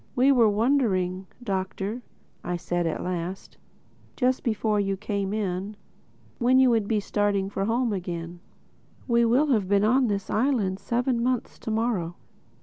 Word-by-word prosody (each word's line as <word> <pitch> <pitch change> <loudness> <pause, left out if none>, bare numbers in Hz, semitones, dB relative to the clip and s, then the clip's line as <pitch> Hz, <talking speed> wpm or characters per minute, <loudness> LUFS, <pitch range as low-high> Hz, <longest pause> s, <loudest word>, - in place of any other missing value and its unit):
"We 260 +2 +5
were 235 -5 +5
wondering, 200 -6 +1 0.2
Doctor," 195 +2 -3 0.6
said 175 0 -1
I - - +1
at - - -4
last,—"just 185 - -4
before 215 -2 0
you 195 -1 0
came 200 -1 -2
in—when 210 +5 -3
you 260 -1 +5
would 220 -3 +1
be 215 -1 +1
starting 200 -1 0
home 225 +4 0
again. 175 -2 -5 0.7
We 235 -1 +3
will 270 +6 +3
have 205 -5 +1
been 200 0 +3
on 250 +4 +3
this 200 -2 -2
island 215 -6 +1
seven 240 +3 0
months 250 0 -1
to - - -6
morrow." 215 -7 -1
210 Hz, 140 wpm, -26 LUFS, 190-240 Hz, 0.7 s, We